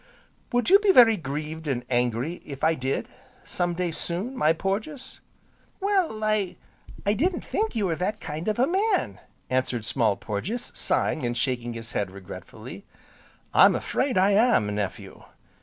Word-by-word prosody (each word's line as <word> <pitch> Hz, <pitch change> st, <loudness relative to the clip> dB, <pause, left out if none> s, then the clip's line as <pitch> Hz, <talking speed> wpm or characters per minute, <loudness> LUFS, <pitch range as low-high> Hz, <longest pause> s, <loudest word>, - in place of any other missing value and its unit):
"Would 245 Hz, +7 st, +1 dB
you 395 Hz, -, +9 dB
be 410 Hz, -1 st, +4 dB
very 235 Hz, -9 st, +7 dB
grieved, 155 Hz, 0 st, -5 dB
and 125 Hz, -3 st, -2 dB
angry, 125 Hz, +6 st, -1 dB
if 140 Hz, -2 st, -9 dB
I 160 Hz, -, +4 dB
did, 135 Hz, -2 st, -2 dB, 0.4 s
some 175 Hz, -1 st, -1 dB
day 180 Hz, -1 st, -1 dB
soon, 180 Hz, +10 st, -3 dB
my 155 Hz, -11 st, +3 dB
Porges?" 205 Hz, -, -3 dB, 0.6 s
"Well, 380 Hz, -, 0 dB
I 215 Hz, -4 st, 0 dB, 0.5 s
I 205 Hz, -, +3 dB
didn't 345 Hz, -, 0 dB
think 440 Hz, +1 st, -1 dB
you 215 Hz, -3 st, +1 dB
were 170 Hz, -3 st, 0 dB
that 205 Hz, +4 st, -2 dB
kind 155 Hz, +5 st, -6 dB
of 215 Hz, -, 0 dB
a 250 Hz, -, +4 dB
man!" 395 Hz, +7 st, 0 dB, 0.3 s
answered 130 Hz, -3 st, -1 dB
Small 110 Hz, -6 st, +1 dB
Porges, 200 Hz, -, -4 dB
sighing 155 Hz, -, 0 dB
and 120 Hz, 0 st, -1 dB
shaking 120 Hz, -1 st, -1 dB
his 115 Hz, 0 st, -8 dB
head 100 Hz, -4 st, -1 dB
regretfully. 95 Hz, -1 st, -10 dB, 0.7 s
"I'm -, -, +7 dB
afraid 260 Hz, -5 st, -1 dB
I 190 Hz, +2 st, +4 dB
am, 200 Hz, -, +3 dB
nephew." 100 Hz, -1 st, -5 dB
170 Hz, 155 wpm, -26 LUFS, -, 0.7 s, you